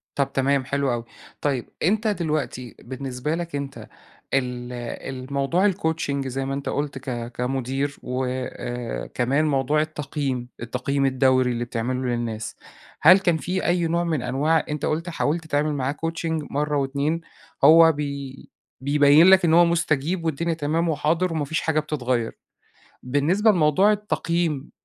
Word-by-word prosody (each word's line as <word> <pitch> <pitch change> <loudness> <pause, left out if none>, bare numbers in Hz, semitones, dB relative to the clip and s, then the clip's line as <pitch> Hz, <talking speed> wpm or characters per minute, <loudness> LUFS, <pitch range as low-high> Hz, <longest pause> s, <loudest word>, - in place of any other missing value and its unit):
طب 140 -1 0
تمام، 135 0 +1
حلو 140 -1 0
أوي. 120 -1 -3 0.4
طيب، 135 -5 -1
أنت 215 +6 +2
دلوقتي 155 - -2
بالنسبة 130 +3 -4
لك 170 -3 -4
أنت 140 -1 -6 0.5
ال 125 -2 -1 0.6
الموضوع 165 +9 +2
الcoaching 160 -6 -2
زي 135 +1 -3
ما 135 +1 -2
أنت 140 - -4
قلُت 145 -2 -2
ك 120 -2 -5
كمُدير، 135 +3 -2
وآآ 125 - -4
كمان 135 +5 +1
موضوع 145 0 +1
التقييم. 140 -5 -3
التقييم 135 +3 -1
الدوري 130 -1 +3
اللي 120 0 -2
بتعمله 125 +2 -2
للناس. 115 -2 -3 0.4
هل 180 +5 +8
كان 175 -4 +2
في 185 +4 -2
أي 175 -1 +2
نوع 170 +1 0
من 155 -7 -1
أنواع 155 +4 +1
أنت 150 0 -3
قُلت 165 +3 -1
حاولت 165 -1 -1
تعمل 150 0 0
معاه 135 0 -1
coaching 165 -1 -3
مرّة 150 +1 0
و2 140 +4 0 0.4
هو 165 +2 +8
بي 140 -2 -6 0.3
بيبيّن 145 +3 +5
لك 190 -1 +7
إن 165 -1 +4
هو 175 - +7
مُستَجيب 170 0 0
والدنيا 165 +2 -1
تمام 160 +2 0
وحاضر، 165 +3 +1
وما 155 -2 -1
فيش 160 +3 -1
حاجة 155 -1 +1
بتتغيّر. 125 -6 -2 0.7
بالنسبة 155 - +2
لموضوع 185 +3 +4
التقييم، 170 -8 -1
145 Hz, 145 wpm, -24 LUFS, 130-165 Hz, 0.7 s, هل